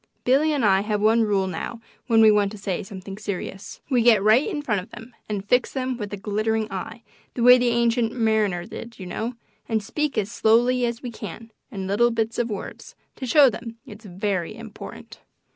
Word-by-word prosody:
Billy 280 +5 +3
and 280 -6 +1
I 195 -1 +4
have 210 0 -1
one 220 +2 +4
rule 205 -3 +1
now 190 +5 -5 0.3
when 225 -2 +5
we 215 - +8
want 205 -1 +2
to - - -8
say 195 -3 -3
something 195 0 -9
serious. 195 -1 -6
We 255 -4 +2
get 225 -4 +5
right 220 - +4
in 300 -7 -4
front 210 -8 0
of 180 - -14
them 225 +2 -12
and 205 -1 -4
fix 250 +3 +2
them 260 -1 -2
with 210 -4 -6
a 205 - -4
glittering 215 +2 -1
eye, 225 +5 -6 0.3
the 240 - -1
way 250 +1 +8
the 245 - +1
Ancient 235 -1 +2
Mariner 215 -7 0
did, 230 +3 -9
you 190 - -8
know, 225 +7 -4 0.3
and 220 -2 0
speak 300 +4 -2
as 210 0 -1
slowly 240 +3 +3
as 235 +1 -5
we 245 - -5
can, 225 +1 -9 0.2
in 195 -2 -5
little 210 +5 +3
bits 225 -1 -2
of 240 0 0
words, 205 -3 -7 0.2
to 260 - -5
show 285 +3 +7
them 230 -1 -4
it's 215 +1 -12
very 190 0 -3
important. 225 -2 -10
220 Hz, 210 wpm, -24 LUFS, 205-240 Hz, 0.3 s, we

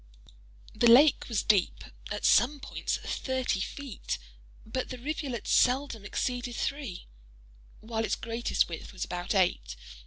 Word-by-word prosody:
The 235 +2 +4
lake 275 +5 +6
was 225 -4 0
deep—at 200 -4 -1
some 285 +4 +4
points - - -3
thirty 260 -6 -2
feet—but 125 - -6
the 255 - -5
rivulet 275 -2 -4
seldom 250 -4 +2
exceeded 245 +2 -2
three, 275 -11 -4 0.8
while 225 0 -2
its - - 0
greatest 230 +1 0
width 165 +3 -8
was 185 - -3
about 180 +3 -3
eight. - - +1
230 Hz, 120 wpm, -29 LUFS, 185-260 Hz, 0.8 s, lake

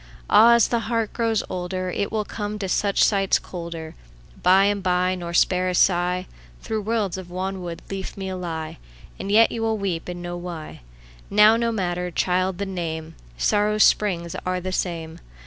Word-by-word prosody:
Áh! 235 +2 +8
ás 235 - +4
the 235 - 0
heart 230 -3 -1
grows 225 -2 0
olderIt 185 +2 -3
will 215 -1 -1
come 210 0 -4
to 200 -2 -3
such 200 +2 +2
sights 195 -2 +3
colderBy 170 -3 -7 0.5
and 195 +2 +4
by, 180 0 +1
nor 175 -2 -5
spare 180 +1 +2
a - - -1
sighThough 180 - -1
worlds 210 -4 -1
of 185 - -9
wanwood 185 -1 -4
leafmeal 190 -1 -5
lie; 160 - -5 0.4
And 195 +1 -4
yet 225 +2 +6
you 230 - -4
wíll 225 -1 0
weep 185 -5 -3
and 175 0 -5
know 175 0 -5
why. 175 - -7 0.5
Now 210 +2 +6
no 230 0 0
matter, 180 -4 -2
child, 185 +1 0
the 200 - -2
name:Sórrow's 170 - -1
spríngs 170 -5 +2
áre 185 -1 -2
the 185 - -3
same. 165 -3 -3
185 Hz, 160 wpm, -23 LUFS, 175-205 Hz, 0.5 s, Áh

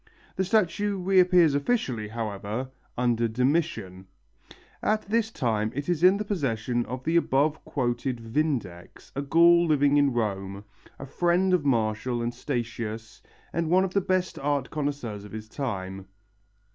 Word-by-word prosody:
The 190 - 0
statue 205 0 +1
reappears 180 -4 +4
officially, 140 - 0
however, 110 +3 -4 0.3
under 120 -1 +1
Domitian. 115 - -1 0.7
At 215 0 +1
this 225 +1 0
time 110 - -1
it 145 +1 -4
is 175 -3 0
in 185 +2 +6
the 210 - -3
possession 120 - -1
of 125 +2 -5
the 165 +4 +2
above 150 0 +1
quoted 125 -1 -2
Vindex, 115 - -3
a 140 - -1
Gaul 170 +4 +5
living 145 -2 +3
in 140 -1 +4
Rome, 100 -4 -3 0.3
a 135 - -7
friend 175 +6 +1
of 170 -5 +2
Martial 115 -1 0
and 120 +1 -2
Statius 115 -3 -5 0.3
and 165 -1 -1
one 185 +2 +4
of 190 -1 -3
the 200 - +2
best 185 0 -1
art 140 -1 -1
connoisseurs 140 -9 -3
of 105 - -12
his 110 0 -7
time. 95 -7 -5
135 Hz, 145 wpm, -26 LUFS, 115-170 Hz, 0.7 s, in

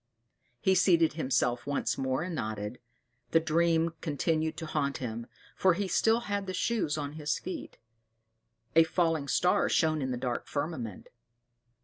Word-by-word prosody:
He 190 - +3
seated 175 -3 +4
himself 130 -4 0
once 145 - 0
more 130 +3 -1
and 180 0 -4
nodded: 110 -4 -4 0.5
the 165 - +4
dream 165 +1 +2
continued 160 +1 0
to 165 - -5
haunt 140 -3 -1
him, 115 -2 -5 0.3
for 185 -2 +3
he 200 +1 -1
still 225 +5 +3
had 205 -3 -3
the 185 - -3
shoes 180 -9 0
on 145 -1 -4
his 150 -1 -1
feet. 185 - -7 1.0
A 165 - +8
falling 160 -3 0
star 180 +5 +2
shone 155 -2 +2
in 130 - -1
the 125 - -2
dark 120 -1 -3
firmament. 145 - -4
155 Hz, 150 wpm, -30 LUFS, 135-170 Hz, 1.0 s, A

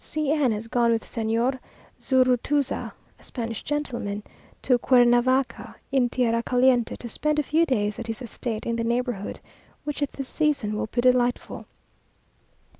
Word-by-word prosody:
C 305 -2 -1
n 295 -6 +2
has 215 +1 -3
gone 235 0 +2
with 225 -1 0
Señor 230 +4 -1 0.4
Zurutuza 260 +2 +1 0.3
(a - - -20
Spanish 230 -3 -5
gentleman), 240 -8 -3 0.4
to 250 -2 +3
Cuernavaca, 245 +1 +3 0.2
in 255 -3 +2
tierra 230 -2 +1
caliente, 250 -1 +2
to 240 - -8
spend 300 +6 -1
a 300 - +2
few 325 +4 +2
days 210 -6 0
at 235 - -6
his 225 -1 -4
estate 230 -1 -5
in 235 0 -1
the 230 - -1
neighbourhood; 235 -3 -2 0.4
which 295 0 -4
at 285 - -1
this 275 -2 -5
season 285 -10 0
will 215 - -2
be 240 +2 -1
delightful. 250 -1 +1
245 Hz, 155 wpm, -25 LUFS, 230-270 Hz, 0.4 s, to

